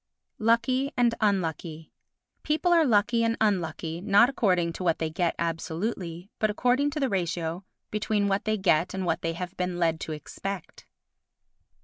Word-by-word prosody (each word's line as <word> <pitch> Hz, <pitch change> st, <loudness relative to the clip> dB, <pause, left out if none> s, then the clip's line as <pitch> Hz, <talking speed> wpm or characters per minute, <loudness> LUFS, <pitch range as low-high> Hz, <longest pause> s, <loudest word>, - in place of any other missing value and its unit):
Lucky 255 Hz, +5 st, +2 dB
and 240 Hz, -1 st, +3 dB
Unlucky 165 Hz, -5 st, -1 dB, 0.5 s
People 320 Hz, +4 st, +1 dB
are 330 Hz, -3 st, +5 dB
lucky 230 Hz, +1 st, +3 dB
and 230 Hz, 0 st, +1 dB
unlucky 175 Hz, -5 st, -1 dB
not 205 Hz, +5 st, +5 dB
according 180 Hz, -9 st, +1 dB
to 185 Hz, -, -6 dB
what 170 Hz, -2 st, +2 dB
they 160 Hz, -1 st, -2 dB
get 170 Hz, +1 st, 0 dB
absolutely, 170 Hz, +2 st, -3 dB
but 215 Hz, -, +2 dB
according 250 Hz, +6 st, +2 dB
to 300 Hz, -, -4 dB
the 275 Hz, -, +1 dB
ratio 175 Hz, -3 st, -2 dB, 0.3 s
between 210 Hz, -1 st, 0 dB
what 195 Hz, +2 st, 0 dB
they 215 Hz, 0 st, +1 dB
get 185 Hz, -2 st, +2 dB
and 190 Hz, -1 st, -2 dB
what -, -, 0 dB
they 165 Hz, 0 st, -1 dB
have 180 Hz, +2 st, -6 dB
been 180 Hz, -1 st, -2 dB
led 165 Hz, -2 st, +1 dB
to 160 Hz, -, -5 dB
expect. 180 Hz, +4 st, -7 dB
190 Hz, 160 wpm, -27 LUFS, 170-230 Hz, 0.5 s, are